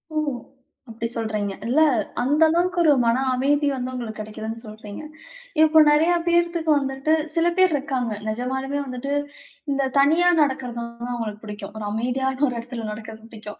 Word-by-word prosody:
ஓ! - - 0 0.7
அப்பிடி 230 +1 -4
சொல்றீங்க, 215 -3 -2
இல்ல. 265 +6 +2 0.4
அந்த 290 +5 +3
அளவுக்கு, 350 +2 +1
ஒரு 310 - +6
மன 240 +3 +2
அமைதி 285 +3 +2
வந்து 255 -1 -3
உங்களுக்கு 230 -4 -6
கெடைக்கிதுன்னு 220 +2 -6
சொல்றீங்க. 215 -1 -9 0.6
இப்போ 315 0 +6
நெறைய 320 +4 +4
பேர்த்து 345 0 +2 0.2
வந்துட்டு 270 +2 0 0.2
சில 330 +1 +2
பேர் 370 -3 +5
இருக்காங்க. 265 -4 -2 0.2
நிஜமாலுமே 265 +5 -2
வந்துட்டு, 255 +2 -5 0.6
இந்த 275 -1 +1
தனியா 320 +6 +5
நடக்கிறது 260 -4 -1
வந்து, 235 +1 -7
அவுங்களுக்கு 215 -3 -5
பிடிக்கும். 205 -1 -8
ஒரு 210 - -5
அமைதியான 255 +4 -1
ஒரு 250 - -3
இடத்தில 235 -1 -6
நடக்கிறது 220 +1 -9
பிடிக்கும். 215 -2 -10
255 Hz, 150 wpm, -23 LUFS, 225-290 Hz, 0.7 s, ஒரு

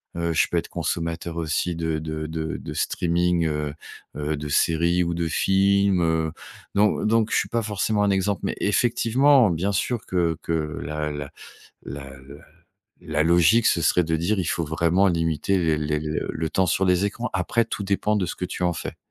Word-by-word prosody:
heu 85 - -4
heu, 85 -1 0
je - - +3
peux - - +1
être - - -1
consommateur 85 0 -3
aussi 85 +2 -1
de 80 -1 -1
de 80 0 -5
de 80 0 -4
de - - -7
streaming, 85 0 0
heu 75 -1 -2 0.4
heu, 75 +1 -2
de 75 0 -6
séries 85 +4 +2
ou 85 - -1
de 85 0 -1
films, 95 +1 +2
heu, 80 -1 +1 0.4
donc 105 +1 +2
donc 115 0 +2
je - - +2
suis - - 0
pas 115 0 0
forcément 105 0 0
un 100 - +2
exemple, 95 0 0
mais - - -2
effectivement, 120 +3 +3
bien 90 +5 -1
sûr 115 +4 -2
que 85 -3 0
que 80 -3 -2
la 75 +1 -3
la 70 -1 -6 0.5
la 70 +1 -7
la - - -12 0.9
la 75 0 -1
logique 85 +7 +4
ce 85 - +3
serait 90 - +3
de 80 0 0
dire: 90 +6 0
«Il 90 - -1
faut 85 - -1
vraiment 85 +5 +2
limiter 80 +2 0
les 80 -3 +1
les 75 0 -1
le 80 +1 -3
temps 95 - +1
sur 90 +2 +1
les 90 +2 +2
écrans». 115 +4 -3
Après, 95 +5 +1
tout 100 - -4
dépend 100 +2 0
de 100 -3 0
ce 85 - -5
que - - -6
tu 90 - -5
en 90 -1 +2
fais. - - -6
85 Hz, 200 wpm, -24 LUFS, 80-100 Hz, 0.9 s, logique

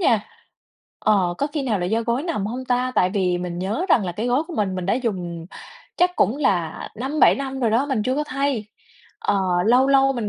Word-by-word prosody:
nha. 230 - +3 0.8
Ờ, 190 -5 +2
có 285 - +1
khi 295 -1 -3
nào 220 -7 0
là 175 - -2
do 225 +5 0
gối 235 +4 -1
nằm 310 - -2
hông 250 +4 -5
ta? 250 0 0
Tại 180 - +3
vì 180 -3 0
mình 175 -1 -4
nhớ 205 - -2
rằng 225 - +4
là 175 - -3
cái 220 +7 -3
gối 250 +5 +2
của 345 - -8
mình, 195 -3 0
mình 185 -1 -4
đã 195 - +2
dùng 180 -9 -3 0.5
chắc 360 +1 +2
cũng 230 - +2
là 180 - -1
5-7 275 +6 +3
năm 270 -1 -4
rồi 230 -3 +2
đó, 250 +6 +2
mình 260 -7 0
chưa 255 +2 0
có 300 - 0
thay. 275 -5 -1 0.5
Ờ, 200 - 0 0.3
lâu 250 +4 +5
lâu 270 0 +4
mình 230 -5 -3
235 Hz, 230 wpm, -22 LUFS, 195-270 Hz, 0.8 s, lâu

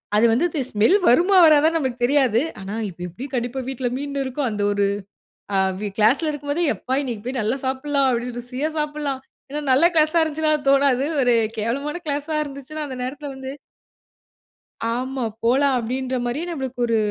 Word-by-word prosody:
அது 215 - +5
வந்து 250 +10 +2
இந்த 300 -4 -2
ஸ்மெல் 220 - +3
வருமா 355 +10 +5
வராதானு 310 +1 +5
நம்மளுக்குத் 255 -6 -1
தெரியாது. 255 -4 +3 0.2
ஆனா, 195 +2 -6
"இப்ப 175 0 -12
எப்படி 185 +10 -8
கண்டிப்பா 245 +1 -2
வீட்டில 255 -2 -2
மீன் 280 0 -3
இருக்கும்." 260 +1 -2
அந்த 205 -1 -3
ஒரு 200 0 +1 0.7
அ - - +3 0.4
கிளாஸ்‌ல 245 +9 +3
இருக்கும் 290 -1 -5
போதே 345 +4 0
எப்பா 260 - -3
இன்னைக்கு 235 -6 -5
போய் 255 +1 -3
நல்லா 220 +5 0
சாப்பிடலாம், 270 +1 +1
அப்படி 240 0 -1
ருசியா 255 +5 -3
சாப்பிடலாம். 295 -3 -2 0.3
ஏன்னா 295 +1 -3
நல்ல 275 +6 +5
கிளாஸா 315 +1 +4
இருந்துச்சுனா 315 0 0
அது 285 -2 -11
தோணாது. 275 -1 +3 0.2
ஒரு 245 -2 +3 0.2
கேவலமான 280 +9 -2
கிளாஸா 295 +2 -2
இருந்துச்சுனா 280 +2 -8
அந்த 260 -2 -6
நேரத்தில 280 +3 -5
வந்து 265 0 -7 1.4
ஆமா, 255 +2 -2 0.2
போலாம் 270 +3 +3
அப்படின்ற 255 +2 -2
மாதிரி 245 +6 -2
நம்மளுக்கு 265 -6 -5
ஒரு 230 -1 +1
265 Hz, 170 wpm, -22 LUFS, 245-295 Hz, 1.4 s, அது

